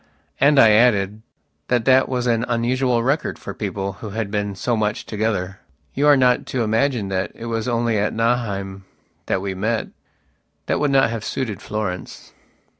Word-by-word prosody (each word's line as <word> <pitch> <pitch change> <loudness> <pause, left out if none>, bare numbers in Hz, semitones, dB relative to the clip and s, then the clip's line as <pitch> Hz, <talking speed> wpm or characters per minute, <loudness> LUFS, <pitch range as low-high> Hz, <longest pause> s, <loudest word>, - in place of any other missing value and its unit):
And 145 +1 +4
I 110 -3 +7
added, 105 -2 +3 0.5
that 120 -2 +1
that 130 0 +4
was 125 -2 -1
an 115 -1 +1
unusual 120 0 +1
record 140 +5 0
for - - -7
people 100 -1 -4
who 110 - -6
had 105 0 -4
been 105 -1 -2
so 120 +6 -1
much 105 -1 -1
together. 100 -4 -2 0.3
You 145 +2 +1
are 145 -1 +7
not 125 -1 +2
to 125 -3 -1
imagine 115 -1 0
that 95 0 -2
it 115 - -8
was 115 0 -2
only 115 -2 +1
at 105 - 0
Nauheim 100 -5 -1 0.4
that 95 - -1
we 95 -1 -2
met. 110 +4 -2 0.8
That - - 0
would 150 - +1
not 135 -4 +3
have 115 -2 -4
suited 115 -4 -3
Florence. 105 -4 -5
115 Hz, 175 wpm, -21 LUFS, 100-125 Hz, 0.8 s, I